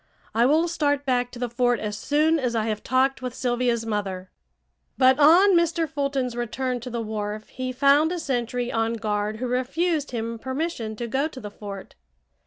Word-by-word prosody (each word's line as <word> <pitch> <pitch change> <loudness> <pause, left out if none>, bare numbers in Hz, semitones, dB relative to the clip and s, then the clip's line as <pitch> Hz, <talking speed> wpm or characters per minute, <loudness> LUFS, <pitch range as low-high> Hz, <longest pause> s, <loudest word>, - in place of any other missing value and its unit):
I 235 +3 +4
will 315 +5 +3
start 290 -4 0
back 250 -2 +1
to 245 - -11
the 245 0 -2
fort 245 0 +1
as 210 -1 -3
soon 305 +7 +2
as 250 -3 -1
I 220 -1 +1
have 215 -2 -2
talked 260 +1 +1
with 250 -1 -5
Sylvia's 240 -2 0
mother." 195 -4 -3 0.7
But 260 +1 +5
on 350 +7 +7
Mr. 335 -1 +2
Fulton's 275 -4 -2
return 245 +2 -2
to 245 +2 -7
the 235 -1 -3
wharf 215 0 -4
he 255 0 -4
found 280 +5 +4
a 360 - -2
sentry 245 -5 -2
on 225 0 0
guard 215 -1 -2
who 250 - -3
refused 290 +5 0
him 230 -1 -4
permission 260 -4 -3
to 235 - -4
go 265 +6 0
to 295 -5 -10
the 210 -4 -8
fort. 200 -2 -9
250 Hz, 190 wpm, -24 LUFS, 225-280 Hz, 0.7 s, on